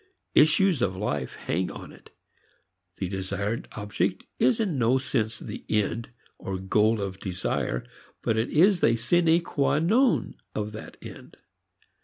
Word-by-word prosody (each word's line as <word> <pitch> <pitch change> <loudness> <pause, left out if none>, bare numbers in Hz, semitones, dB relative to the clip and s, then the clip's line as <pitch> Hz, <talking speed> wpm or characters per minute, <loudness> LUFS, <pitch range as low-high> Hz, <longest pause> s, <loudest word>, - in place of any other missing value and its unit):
Issues 160 0 +5
of 95 -6 +1
life 75 -9 -3
hang 90 +3 -2
upon - - -9
it. - - -17 0.9
The 95 - -2
desired 100 +4 -3
object 100 -2 -1 0.2
is 130 - +3
in 185 - 0
no 120 +2 +3
sense 115 -4 -1
the - - -8
end 110 +2 0 0.3
or 95 -1 -4
goal 105 +4 +2
of 95 -1 -4
desire, 90 -10 -2 0.4
but 110 - +1
it 110 +2 0
is 185 +4 +4
the 115 - +4
sine 165 +7 +3
qua 140 -3 +1
non 225 - +2 0.2
of 105 0 -2
that 110 - -9
end. - - -11
110 Hz, 145 wpm, -26 LUFS, 95-155 Hz, 0.9 s, Issues